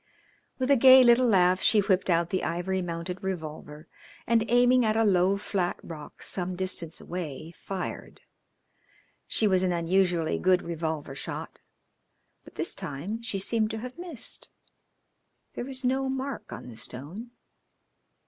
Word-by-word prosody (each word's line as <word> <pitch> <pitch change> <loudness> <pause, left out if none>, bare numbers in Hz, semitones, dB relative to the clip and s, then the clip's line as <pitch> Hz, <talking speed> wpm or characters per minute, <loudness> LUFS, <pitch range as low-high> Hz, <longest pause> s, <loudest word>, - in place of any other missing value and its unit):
With 260 +1 0
a - - +7
gay 260 +1 +8
little 245 +1 +5
laugh 185 -3 +4
she 220 - +4
whipped 195 -2 +1
out 170 0 +2
the 185 - 0
ivory 180 +3 -1
mounted 175 +1 -5
revolver, 155 -4 -6 0.4
and 230 -1 +3
aiming 245 +1 +5
at 220 0 +1
a 225 - +4
low 190 -1 +3
flat 190 -3 -2
rock, 155 -3 -9
some 180 -1 -1
distance 175 -3 -2
away, 165 -3 -6
fired. 185 +1 -6 1.1
She 220 - +1
was 185 -2 +3
an 185 -1 +1
unusually 175 -1 +1
good 185 -1 +3
revolver 160 -4 -4
shot, 135 - -7 0.8
but - - -16
this - - -1
time 180 +12 -5
she 230 -4 -3
seemed 215 +3 0
to 220 - -4
have 255 +6 -8
missed. 340 -9 -7 1.0
There - - -5
was 260 -1 -4
no 265 +1 +1
mark 265 +1 -4
on - - -8
the 115 - -11
stone. 145 - -7
190 Hz, 150 wpm, -27 LUFS, 170-230 Hz, 1.1 s, gay